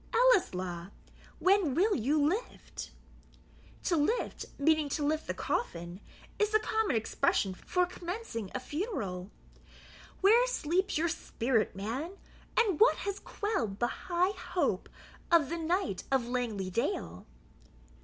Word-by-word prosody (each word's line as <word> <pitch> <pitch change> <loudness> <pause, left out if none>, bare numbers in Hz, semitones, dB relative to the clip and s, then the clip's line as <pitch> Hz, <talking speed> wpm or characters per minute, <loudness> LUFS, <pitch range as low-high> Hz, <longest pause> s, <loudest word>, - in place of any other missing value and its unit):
Ellieslaw, 185 - +3 0.5
when 370 -8 +3
will 400 +5 +3
you 275 +6 +1
LIFT? 410 +10 -4 0.9
[To 350 - +2
LIFT, 375 +12 0
meaning 310 0 +3
to 290 +1 -1
lift 310 +1 0
the - - -2
coffin, 175 - -3 0.4
is 420 - +3
the 435 0 +4
common 440 - 0
expression 210 -3 +1
for 360 - 0
commencing 350 - -5
a - - 0
funeral.] 255 - -4 0.9
where 455 +6 +6
sleeps 375 -5 0
your 330 +2 +2
spirit, 235 -9 0
man? 260 - -4 0.4
and 420 -8 +3
what 460 +3 +7
has 400 0 -4
quelled 255 - -2
the 240 - +1 0.2
high 360 +2 +3
hope 280 - -1 0.4
of 330 -5 +5
the 335 - -2
Knight 340 - 0
of 265 -3 +2
Langley 230 -6 -2
dale?" 90 - -2
315 Hz, 125 wpm, -31 LUFS, -, 0.9 s, what